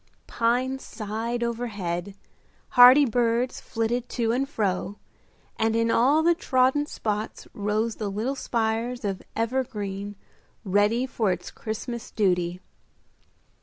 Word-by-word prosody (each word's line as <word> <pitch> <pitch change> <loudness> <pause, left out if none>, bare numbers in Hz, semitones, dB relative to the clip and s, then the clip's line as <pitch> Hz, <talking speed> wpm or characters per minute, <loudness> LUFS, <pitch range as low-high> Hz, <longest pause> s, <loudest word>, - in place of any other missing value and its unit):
Pines 255 +3 0
sighed 225 +2 -4
overhead, 205 -6 -3 0.5
hardy 250 +4 +8
birds 240 +1 0
flitted 235 +2 -2
to 230 -2 0
and 270 +3 0
fro, 200 -4 -2 0.6
and 225 0 +2
in 230 0 +2
all 280 +8 +4
the 345 +1 +5
trodden 265 -1 +2
spots 215 -6 -4
rose 215 +2 -1
the 210 -2 -3
little 220 +7 -2
spires 230 -2 -2
of 195 -2 -2
evergreen 210 -5 -2 0.5
ready 205 +6 +2
for 225 -6 0
its 180 0 -4
Christmas 230 +1 -5
duty. 180 -4 0
230 Hz, 115 wpm, -26 LUFS, 205-245 Hz, 0.6 s, hardy